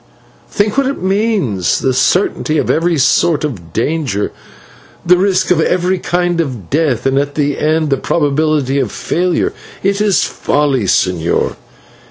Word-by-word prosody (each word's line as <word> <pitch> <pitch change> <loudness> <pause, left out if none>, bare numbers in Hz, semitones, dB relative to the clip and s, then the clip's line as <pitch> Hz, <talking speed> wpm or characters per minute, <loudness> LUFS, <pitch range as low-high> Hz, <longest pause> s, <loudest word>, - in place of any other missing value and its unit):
Think 210 +5 0
what 275 - +1
it 275 - -3
means: 190 - 0
the 130 - 0
certainty 155 +3 +1
of - - +1
every 165 0 +1
sort 155 +3 +2
of 95 - -5
danger, 120 - -1 0.7
the 180 +1 +6
risk 185 0 +1
of 170 -3 +3
every 180 +2 +1
kind 175 -1 0
of 125 - -6
death, 145 -5 0
and 135 0 +2
at 145 0 -3
the 145 -2 -1
end, 155 -1 +1
the 135 - +2
probability 145 -2 0
of 125 -7 -1
failure. 180 0 -1 0.3
It 200 +1 +1
is 205 -3 +2
folly, 140 -6 0
señor." 90 -3 0
155 Hz, 150 wpm, -15 LUFS, 135-180 Hz, 0.7 s, the